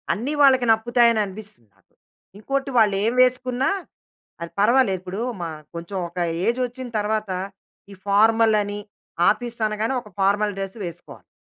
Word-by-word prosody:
అన్నీ 255 Hz, +8 st, -3 dB
వాళ్ళకి 260 Hz, -3 st, +5 dB
నప్పుతాయి 240 Hz, +1 st, +3 dB
అని 220 Hz, -, +1 dB
అనిపిస్తుంది 195 Hz, -, -10 dB
నాకు. -, -, -36 dB, 0.5 s
ఇంకోటి 275 Hz, +4 st, -2 dB
వాళ్ళు 205 Hz, -3 st, +4 dB
ఏం 230 Hz, -, +1 dB
వేసుకున్నా 255 Hz, 0 st, 0 dB, 0.7 s
అది 170 Hz, -, -5 dB
పర్వాలేదు. 215 Hz, -3 st, +3 dB
ఇప్పుడు 185 Hz, +2 st, -6 dB, 0.2 s
మా 165 Hz, -, -3 dB, 0.3 s
కొంచెం 170 Hz, +4 st, -6 dB
ఒక 170 Hz, -, -23 dB, 0.3 s
ఏజ్ 235 Hz, +2 st, +1 dB
వచ్చిన 250 Hz, +1 st, -8 dB
తర్వాత 215 Hz, -1 st, -1 dB, 0.6 s
ఈ -, -, -9 dB
ఫార్మల్ 220 Hz, +2 st, +4 dB
అని 205 Hz, 0 st, -5 dB, 0.5 s
ఆఫీస్ 235 Hz, +2 st, -3 dB
అనగానే 215 Hz, +4 st, -2 dB
ఒక 210 Hz, -, -15 dB
ఫార్మల్ 205 Hz, +1 st, +2 dB
డ్రెస్సు 195 Hz, +3 st, -5 dB
వేసుకోవాలి. 170 Hz, 0 st, -11 dB
215 Hz, 145 wpm, -22 LUFS, 200-245 Hz, 0.7 s, వాళ్ళకి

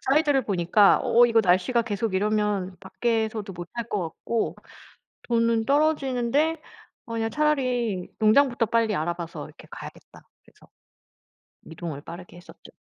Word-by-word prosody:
사이즈를 280 Hz, 0 st, +2 dB
보니까 195 Hz, +1 st, +3 dB
어 240 Hz, +1 st, +5 dB
이거 230 Hz, -1 st, +3 dB
날씨가 185 Hz, +7 st, +2 dB
계속 215 Hz, -2 st, -3 dB
이러면 205 Hz, -2 st, 0 dB
밖에서도 220 Hz, 0 st, -2 dB
못 175 Hz, -1 st, -8 dB
할 235 Hz, -1 st, -4 dB
것 210 Hz, -4 st, -1 dB
같고 225 Hz, +7 st, -3 dB, 0.7 s
돈은 230 Hz, -1 st, +1 dB
떨어지는데 290 Hz, +1 st, +1 dB, 0.5 s
어 230 Hz, -, -8 dB
그냥 225 Hz, 0 st, -1 dB
차라리 250 Hz, -10 st, 0 dB
농장부터 240 Hz, +2 st, +3 dB
빨리 225 Hz, -1 st, +1 dB
알아 170 Hz, +1 st, -1 dB
봐서 170 Hz, -1 st, -7 dB
이렇게 -, -, -15 dB
가야겠다.' -, -, -11 dB, 0.2 s
그래서 -, -, -22 dB, 1.0 s
이동을 160 Hz, -3 st, -7 dB
빠르게 175 Hz, +2 st, -11 dB
했었죠. 175 Hz, -, -15 dB
225 Hz, 320 characters per minute, -25 LUFS, 190-245 Hz, 1.0 s, 어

